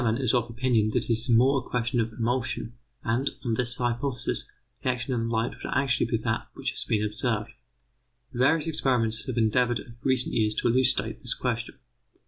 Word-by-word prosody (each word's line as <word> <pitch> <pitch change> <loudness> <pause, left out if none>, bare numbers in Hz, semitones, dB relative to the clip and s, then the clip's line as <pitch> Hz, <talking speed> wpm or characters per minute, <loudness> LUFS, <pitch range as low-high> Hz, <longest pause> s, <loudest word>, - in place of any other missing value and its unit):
Tamman 115 -1 +1
is 130 -3 +1
of 120 -1 +1
opinion 115 -2 +1
that - - +2
it - - -3
is 115 +3 -1
more 130 +4 +5
a - - -7
question 125 0 -1
of 115 0 0
an 110 - -15
emulsion, 120 0 -1 0.3
and, 120 +4 +1 0.2
on 115 - +1
this 120 +1 0
hypothesis, 125 +1 0 0.3
the - - 0
action 125 +1 -1
on 115 -1 -1
light 115 0 0
would - - -7
actually 135 -4 +2
be 115 - 0
that 110 -2 -1
which - - -2
has - - -4
been 105 -1 +1
observed. 105 +1 -1 0.8
Various 140 +6 +3
experimenters 120 -8 0
have 125 -2 -3
endeavoured 120 +2 +2
of 115 - -11
recent 130 -2 +2
years 110 -1 +1
to 120 - +1
elucidate 125 +1 +2
this - - -1
question. - - -2
120 Hz, 195 wpm, -27 LUFS, 115-130 Hz, 0.8 s, more